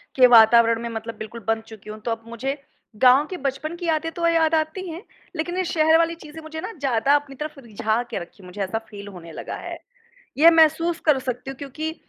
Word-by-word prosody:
के 255 -1 +7
वातावरण 230 0 +6
में 235 - -4
मतलब 225 0 -6
बिल्कुल 230 +2 -8
बँध 225 0 +1
चुकी 215 -1 -12
हूँ। 215 - -7
तो 235 - -1
अब 225 0 -4
मुझे 265 +5 -4 0.4
गाँव 255 +5 +6
के 365 - -5
बचपन 280 +4 -3
की 345 0 -7
यादें 325 0 0
तो 340 +1 -1
याद 330 -1 +3
आती 315 +4 -2
हैं 330 +4 -7 0.3
लेक़िन 350 +3 -3
ये 370 - +1
शहर 320 -1 +4
वाली 335 0 +1
चीज़ें 315 0 -11
मुझे 315 0 -7
ना - - -5
ज़्यादा 270 +1 +2
अपनी 285 -1 -2
तरफ़ 300 +1 -6
रिझा 225 -1 -1
के - - -3
रखीं 180 +3 -12
हैं। - - -12
मुझे 200 +3 -7
ऐसा 195 +4 -2
फ़ील 205 -1 -9
होने 175 -4 -10
लगा - - -6
है। - - -7 0.6
ये 325 +3 +8
महसूस 330 +1 +3
कर 300 -4 +4
सकती 255 0 -5
हूँ 265 - -11
क्योंकि 310 +3 -5
275 Hz, 230 wpm, -23 LUFS, 225-320 Hz, 0.6 s, ये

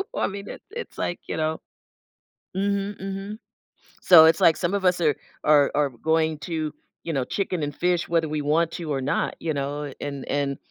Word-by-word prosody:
I - - +1
mean, 200 0 -7
it - - -8
it's 475 +2 -7
like, 175 - -2
you - - -3
know 155 0 -1 1.0
Mhm, 200 +1 -1
mhm, 195 +2 -5 0.6
so, 170 -3 +9
it's 160 +1 +4
like, 165 - +6
some 175 +2 -1
of 195 -2 -1
us 180 -1 +3
are 155 -3 +3 0.3
are 145 -2 +5
are 145 -1 +2
going 160 +5 0
to, 155 -1 -3 0.3
you 165 - -3
know, 135 -3 0
chicken 185 -1 -2
and 145 -1 -3
fish, 175 -1 +1
whether 165 -2 +1
we 150 0 -2
want 160 +3 +2
to 165 -3 -5
or 135 - -1
not, 140 +4 -1
you 160 -2 -2
know, 145 +1 -3
and 140 -2 -5
and, 140 -1 0
160 Hz, 195 wpm, -25 LUFS, 145-180 Hz, 1.0 s, so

